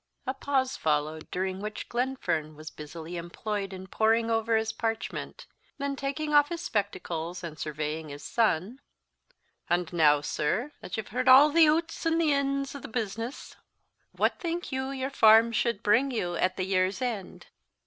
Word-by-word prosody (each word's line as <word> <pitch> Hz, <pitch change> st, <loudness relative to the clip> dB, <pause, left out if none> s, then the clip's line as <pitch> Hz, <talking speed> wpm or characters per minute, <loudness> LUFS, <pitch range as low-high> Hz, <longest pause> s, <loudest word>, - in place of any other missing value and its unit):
'" -, -, -46 dB
A 260 Hz, -, -1 dB
pause 265 Hz, -1 st, 0 dB
followed, 155 Hz, +1 st, -1 dB
during 190 Hz, +1 st, -2 dB
which 210 Hz, +1 st, -5 dB
Glenfern 240 Hz, -, -2 dB
was 155 Hz, +1 st, -9 dB
busily 160 Hz, +3 st, -8 dB
employed 195 Hz, +4 st, -4 dB
in 190 Hz, 0 st, -8 dB
poring 225 Hz, +3 st, +2 dB
over 225 Hz, 0 st, +2 dB
his 220 Hz, 0 st, -1 dB
parchment; 225 Hz, -, -4 dB, 0.3 s
then 280 Hz, 0 st, -2 dB
taking 290 Hz, +3 st, -3 dB
off 290 Hz, 0 st, +6 dB
his 340 Hz, -1 st, -4 dB
spectacles, 180 Hz, -, -3 dB
and 160 Hz, -2 st, -7 dB
surveying 155 Hz, +1 st, -4 dB
his 145 Hz, 0 st, -9 dB
son, 220 Hz, +2 st, 0 dB, 0.9 s
"And 175 Hz, 0 st, 0 dB
now, 150 Hz, -3 st, +5 dB
sir, 185 Hz, -, -1 dB
that -, -, -6 dB
you've 220 Hz, -, -5 dB
heard 255 Hz, +3 st, -2 dB
a' 280 Hz, +4 st, +9 dB
the 330 Hz, -1 st, +7 dB
oots 325 Hz, +2 st, 0 dB
an' 330 Hz, 0 st, +2 dB
ins 275 Hz, -3 st, +1 dB
o' 280 Hz, -, -7 dB
the -, -, -8 dB
business, 225 Hz, +2 st, -5 dB, 0.5 s
what -, -, 0 dB
think 340 Hz, -1 st, -3 dB
you 265 Hz, 0 st, -2 dB
your 265 Hz, 0 st, -3 dB
farm 225 Hz, -2 st, +6 dB
should 230 Hz, -2 st, 0 dB
bring 240 Hz, +7 st, +3 dB
you 180 Hz, -9 st, -2 dB
at 185 Hz, +2 st, 0 dB
the 185 Hz, -, -1 dB
year's 185 Hz, 0 st, +1 dB
end?" 235 Hz, -7 st, -4 dB
220 Hz, 170 wpm, -28 LUFS, 175-270 Hz, 0.9 s, a